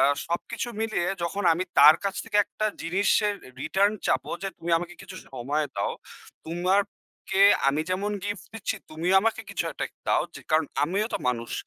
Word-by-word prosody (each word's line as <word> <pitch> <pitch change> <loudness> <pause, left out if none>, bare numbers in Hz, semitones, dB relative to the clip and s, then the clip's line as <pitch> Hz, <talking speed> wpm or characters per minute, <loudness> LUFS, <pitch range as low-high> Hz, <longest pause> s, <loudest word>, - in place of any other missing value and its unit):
আ - - +6 0.2
সবকিছু 170 +7 -3
মিলিয়ে 220 -6 0 0.2
যখন 195 +4 -2
আমি 185 +3 -2
তার 155 - +9
কাছ 195 - -1
থেকে 220 -2 -2
একটা 215 - -2 0.2
জিনিসের 200 +4 +2
এর 130 - -14
রিটার্ন 200 +6 +2
চাবো 130 0 0
যে, 195 - -1
"তুমি 170 +1 -4
আমাকে 175 +1 -7
কিছু 190 -1 -10 0.2
সময় 140 +5 -1
দাও। 100 - 0 0.5
তোমাকে 190 +3 -1 0.3
আমি 140 +2 +1
যেমন 195 +3 -1
গিফট 205 -3 -4
দিচ্ছি 225 - -3
তুমিও 165 +4 0
আমাকে 225 +1 0
কিছু - - -2
একটা - - -3
কে - - -46
দাও। - - +3
যে, - - -8
কারণ, 155 0 +3 0.2
আমিও 195 +7 0
তো - - 0
মানুষ।" 115 -1 -2
180 Hz, 180 wpm, -26 LUFS, 155-200 Hz, 0.5 s, তার